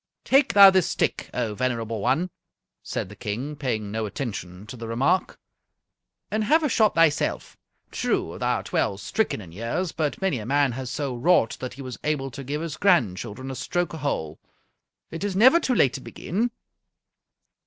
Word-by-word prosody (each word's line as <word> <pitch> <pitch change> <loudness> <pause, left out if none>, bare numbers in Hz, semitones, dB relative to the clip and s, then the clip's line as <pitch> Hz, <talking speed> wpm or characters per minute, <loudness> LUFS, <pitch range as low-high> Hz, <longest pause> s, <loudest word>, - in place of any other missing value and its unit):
"Take 270 +1 +3
thou 200 -1 +10
this 190 -2 +2
stick, - - -1
O 115 -4 -2
venerable 115 -2 -2
one," 155 - +1 0.5
said - - -4
the 105 - -12
King, 120 +10 -4
paying 115 -8 -3
no 110 0 -2
attention 100 -6 -6
to 110 - -9
the 115 -1 -7
remark, 135 +11 +1 0.9
"and 215 +1 0
have 315 +7 +4
a 300 - +2
shot 220 -3 +3
thyself. 165 -3 +1 0.4
True, - - -1
thou - - +1
art - - -6
well 100 - +1
stricken 110 - -1
in 90 -4 -12
years, 115 - -3
but 150 -3 -2
many 190 -10 0
a 105 - -7
man 140 0 +3
has 130 +1 -5
so 140 -2 -3
wrought 120 -2 +3
that 130 -1 -6
he 135 - -8
was 130 -1 -7
able 140 -3 -1
to 140 +3 -8
give 145 +4 -3
his 165 -2 -5
grandchildren 130 - +1
a - - -5
stroke 175 +5 -2
a - - -5
hole. 80 - -3 0.7
It 165 +3 -5
is 200 -2 -2
never 260 - +7
too 260 -6 0
late 135 - +4
to 135 - -6
begin." 215 - -2
135 Hz, 185 wpm, -25 LUFS, 115-175 Hz, 0.9 s, thou